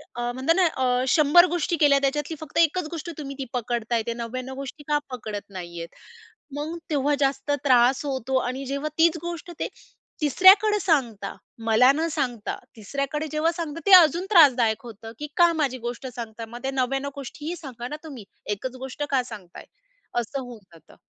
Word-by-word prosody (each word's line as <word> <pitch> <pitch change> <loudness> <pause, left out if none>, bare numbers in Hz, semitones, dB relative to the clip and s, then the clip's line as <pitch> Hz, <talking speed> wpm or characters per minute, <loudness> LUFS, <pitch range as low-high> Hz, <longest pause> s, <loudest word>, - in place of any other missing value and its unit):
अ, 240 - -4
म्हणता 265 +6 +1
ना 370 0 +3
अ, 255 -5 +1
100 305 +5 +6
गोष्टी 345 -1 -1
केल्या 290 -2 +5
त्याच्यातली 295 +3 -1
फक्त 315 0 -8
एकच 335 0 +3
गोष्ट 335 +1 -6
तुम्ही 275 -2 -6
ती 265 - -3
पकडत 240 -1 -3
आहे. 225 -1 +2
ते 235 - -1
99 255 +3 -5
गोष्टी 275 +2 -8
का 295 - +2
पकडत 215 -5 -5
नाही 175 -3 -8
आहे. 165 - -6 0.7
मग 310 +4 -4
तेव्हा 290 -1 +1
जास्त 280 +1 0
त्रास 255 +1 +4
होतो 265 -1 -1
आणि 265 +2 -4
जेव्हा 280 +3 -3
तीच 330 0 +4
गोष्ट 345 0 -6
ते - - -1 0.5
तिसऱ्याकडे 390 - +6
सांगतात, 240 - 0 0.3
मला 235 +4 +6
न 320 +3 0
सांगता, 245 -8 -2 0.2
तिसऱ्याकडे 275 +7 -3
जेव्हा 310 +2 +1
सांगतात 330 -1 -5
ते - - +4
अजून 340 +1 +4
त्रासदायक 245 - +5
होतं 225 -1 -10
की 300 - -4
का 345 -1 +6
माझी 260 -3 0
गोष्ट 245 +2 -5
सांगता. 230 -1 -6
मग 235 +2 -10
त्या 270 - -1
99 270 +2 -1
गोष्टीही 295 +5 -6
सांगा 250 -6 -8
ना 300 - -5
तुम्ही. 270 -10 -9 0.2
एकच 225 +5 -4
गोष्ट 265 +3 -6
का 260 -2 +2
सांगत 205 -7 -11
आहे? - - -10 0.5
असं 255 +4 -4
होऊन 245 -3 -9
जातं. 160 -2 -18
270 Hz, 180 wpm, -25 LUFS, 240-310 Hz, 0.7 s, 100